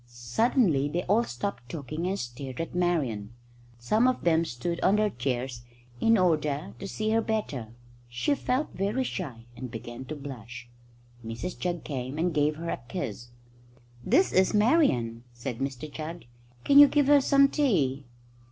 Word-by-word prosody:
Suddenly 140 - +1
they 175 +4 -2
all 215 +5 +3
stopped 120 0 -5
talking 155 +3 -4
and 195 +2 -1
stared 125 0 -6
at 165 - -4
Marian. 135 -12 -1 0.4
Some 215 - +2
of 255 - 0
them 165 -1 +3
stood 170 +7 -3
on 195 - +3
their 210 -1 +2
chairs 125 -2 -3 0.4
in 225 0 +4
order 155 -2 +1
to 195 - -5
see 215 +2 -2
her 225 +1 +3
better. 140 - -3 0.3
She 125 - 0
felt 275 +1 -1
very 205 +7 0
shy, 135 - -5
and 125 +1 -6
began 120 +2 -7
to 155 - -6
blush. 125 -4 -9 0.6
Mrs 115 +11 -5
Jugg 175 -2 -2
came 130 -1 -4
and 170 +1 0
gave 150 0 +2
her 165 +2 -4
a - - -3
kiss. 120 -1 -5 0.8
"This 375 - +3
is 190 +3 +3
Marian," 145 - +2
said 120 0 -5
Mr 135 +1 -3
Jugg. 165 +3 -6 0.4
"Can 280 0 +6
you 290 - +11
give 290 0 +2
her 290 0 +6
some 275 +1 +5
tea?" 150 - +1
155 Hz, 160 wpm, -28 LUFS, 125-205 Hz, 0.8 s, you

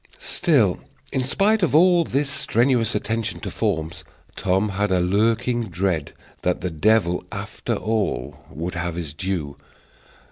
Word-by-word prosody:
Still, 145 - +2 0.3
in 130 - +1
spite 205 +11 +2
of 170 -5 +2
all 175 +1 +6
this 145 -1 0
strenuous 120 -3 +2
attention 110 +1 -2
to - - -5
forms, 80 +1 -2 0.3
Tom 95 +2 +1
had 100 +1 -1
a 95 -1 +2
lurking 115 +5 +1
dread 85 -4 -1 0.3
that 90 0 0
the 90 -1 -2
devil, 90 +1 +2
after - - -4
all, 105 - -2
would 85 +3 -5
have 85 -1 -3
his 80 -5 -4
due. 80 -5 -3
105 Hz, 140 wpm, -23 LUFS, 90-120 Hz, 0.3 s, all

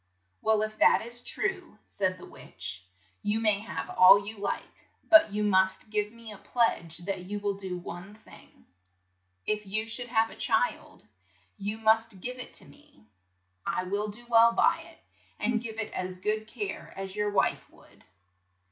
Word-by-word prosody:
"Well, 220 -1 +3
if 215 0 -5
that - - +5
is 240 +1 -3
true," 365 - -2
said 185 -2 -1
the - - -11
witch, 90 +1 -8 0.3
"you 210 +2 0
may 215 -3 +3
have 220 - -5
all 195 +2 +7
you 215 0 -8
like, 200 - -5 0.2
but 320 -8 +7
you 210 +1 -1
must 190 0 +2
give 210 -1 0
me 230 -1 -11
a 205 - -11
pledge 175 -9 0
that 190 -2 -3
you 205 +2 -4
will 205 0 -1
do 190 -2 -5
one 175 +3 -8
thing. 215 - -18 0.8
If 210 -1 -1
you 215 +3 -1
should 240 +2 -4
have 225 -1 +2
a - - -11
child, - - -1 0.5
you 205 +2 -3
must 220 -2 +2
give 250 +6 -5
it 250 - -7
to - - -1
me. 105 -6 -20 0.6
I - - -1
will 200 +3 -1
do 215 +4 -10
well 230 0 +6
by - - +3
it, - - -14 0.4
and 225 +1 0
give 225 -2 -7
it 225 - -2
as 185 0 -4
good 215 +3 -1
care 205 -4 -6
as 195 0 -5
your 210 0 0
wife 205 - 0
would. - - -21
210 Hz, 175 wpm, -29 LUFS, 195-225 Hz, 0.8 s, all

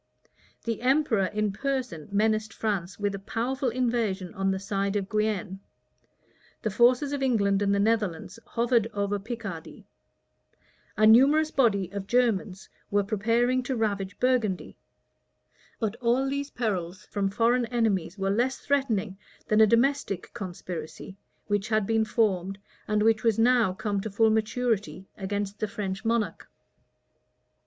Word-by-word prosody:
The 230 -1 -3
emperor 255 -6 +2
in 210 +1 -1
person 250 - -3
menaced 215 +1 +1
France 195 -5 -2
with 205 -1 -1
a 195 - -5
powerful 250 +6 -2
invasion 230 -7 -1
on 195 0 -1
the 190 - 0
side 195 0 -2
of 200 -2 -1
Guienne: 210 -2 -1 1.0
the 215 - -1
forces 250 +6 +3
of 285 - -2
England 205 -7 +2
and 200 -1 +2
the 200 - +2
Netherlands 210 -2 0
hovered 235 -1 +1
over 200 0 -1
Picardy: 200 -6 -7 1.1
a 215 - +4
numerous 280 +8 +6
body 200 - +2
of 200 -1 -5
Germans 220 -6 0 0.2
were 205 0 +2
preparing 230 +5 +1
to 255 +1 -3
ravage 200 -4 -2
Burgundy: 245 -7 0 1.0
but 220 -2 -1
all 250 +3 +1
these 280 +1 -2
perils 200 -5 -3
from 200 -1 -1
foreign 235 +4 +2
enemies 215 -6 0
were 195 0 0
less 245 +6 +1
threatening 220 -9 -1 0.3
than 215 +1 +4
a 220 - +7
domestic 230 -4 +1
conspiracy, 185 -3 -7 0.3
which 205 0 -1
had 215 -2 +2
been 225 +1 +1
formed, 195 -4 0 0.3
and 210 -1 +1
which 220 0 +3
was 225 -3 +2
now 235 -3 +4
come 205 +1 -2
to 220 - -4
full 220 +2 +3
maturity, 220 -3 -1
against 200 +1 -4
the 215 - -1
French 200 -2 -4
monarch. 225 -6 -1
215 Hz, 140 wpm, -27 LUFS, 195-235 Hz, 1.1 s, a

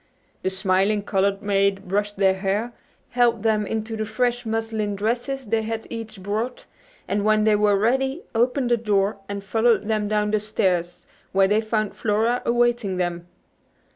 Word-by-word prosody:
The - - 0
smiling 195 +2 +1
colored 195 0 0
maid 200 -1 +1
brushed 205 +2 -1
their 190 -1 +4
hair, 200 +5 -2 0.4
helped 240 -3 +2
them 215 -2 +1
into 225 0 -3
the 215 -1 -3
fresh 245 +2 -1
muslin 220 -2 -2
dresses 240 +6 -2
they 225 +1 0
had 225 0 -4
each 220 -4 -7
brought, 215 +5 -3 0.4
and 200 +1 0
when 215 0 +3
they 215 -1 +4
were 205 -1 +3
ready 265 - 0
opened 245 +2 +1
the 240 - +4
door 205 -2 0
and 200 -1 -4
followed 220 0 +2
them 215 -2 0
down 210 0 0
the 215 - +2
stairs 180 -5 -1 0.3
where 195 0 +4
they 210 +2 +2
found 215 -2 -1
Flora 225 +3 +1
awaiting 240 -5 +1
them. 175 -1 -2
215 Hz, 165 wpm, -23 LUFS, 200-225 Hz, 0.4 s, their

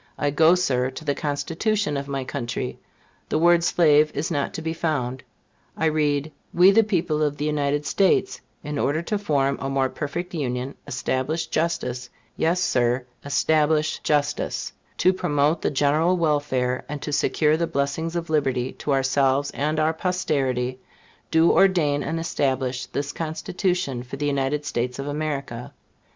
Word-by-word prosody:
I 145 -1 0
go, 160 +4 +5
Sir, 130 -8 +1
to 135 +4 -9
the 145 - +1
Constitution 165 +6 -1
of 140 0 -3
my 135 -1 -3
country: 120 -3 -4 0.5
the - - +1
word 170 +1 +4
slave 155 -3 +4
is 155 +4 -2
not 145 -3 -1
to - - -4
be 160 0 -2
found. 135 -6 -2 0.6
I 160 - 0
read, 150 -1 +1 0.2
"We, 180 +3 +7
the 225 +3 +5
people 175 -7 0
of 145 -1 0
the 150 - -2
United 145 -1 0
States, 195 +3 +2 0.2
in 150 -1 -4
order 155 +4 0
to 210 +4 -2
form 140 -8 0
a 135 - -2
more 135 -1 +1
perfect 175 +7 -5
Union, 130 -3 -2
establish 130 +6 -1
justice," 130 -7 -2 0.3
yes, 170 +3 +1
Sir, 125 -6 +1 0.2
establish 155 +2 +2
justice 145 -1 -1 0.2
"to 185 - +4
promote 150 -2 +1
the - - +1
general 150 +6 +2
welfare, 145 -6 0
and 150 0 -4
to 150 - -4
secure 150 +1 +2
the 165 +1 0
blessings 140 +4 -2
of 170 -1 -2
liberty 130 -4 +1
to 145 - -1
ourselves 135 +1 +2
and 155 +2 -1
our 155 +1 +2
posterity, 135 -8 -1 0.5
do 160 +1 +4
ordain 160 -7 +3
and 165 +3 -2
establish 130 -5 -1
this 140 0 -3
Constitution 165 -3 -2
for 125 +2 -8
the 145 - -2
United 145 +1 0
States 125 -1 -2
of 135 - -4
America." 145 -5 -4
145 Hz, 160 wpm, -24 LUFS, 135-160 Hz, 0.6 s, We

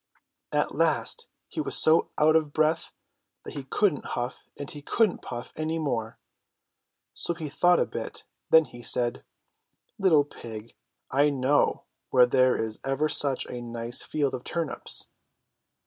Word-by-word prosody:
At - - 0
last 475 - 0 0.2
he 320 - -4
was - - +1
so 160 +1 +5
out 155 +1 +4
of 155 -2 +2
breath 155 +1 +1 0.5
that - - -7
he 140 -2 -6
couldn't 180 +2 +1
huff 120 +1 -5
and 145 - -6
he 145 - -9
couldn't 215 +6 +1
puff 120 -1 -7
any 160 +1 -2
more. 115 -8 -3 1.0
So 170 - -1
he 160 -3 -6
thought 175 +5 +3
a - - +2
bit. - - -6 0.3
Then 160 -1 +6
he 120 - -12
said: 120 0 +1 0.8
"Little 160 -7 +4
pig! 115 -5 -10 0.4
I 145 +2 +4
know 140 +1 +1 0.3
where 125 -1 +6
there 130 +1 +3
is 110 -1 -2
ever 135 +3 0
such 140 -4 +3
a 125 - -7
nice 120 0 -1
field 145 -3 -1
of 125 -1 -5
turnips.' 165 -3 -2
145 Hz, 150 wpm, -27 LUFS, 125-155 Hz, 1.0 s, Then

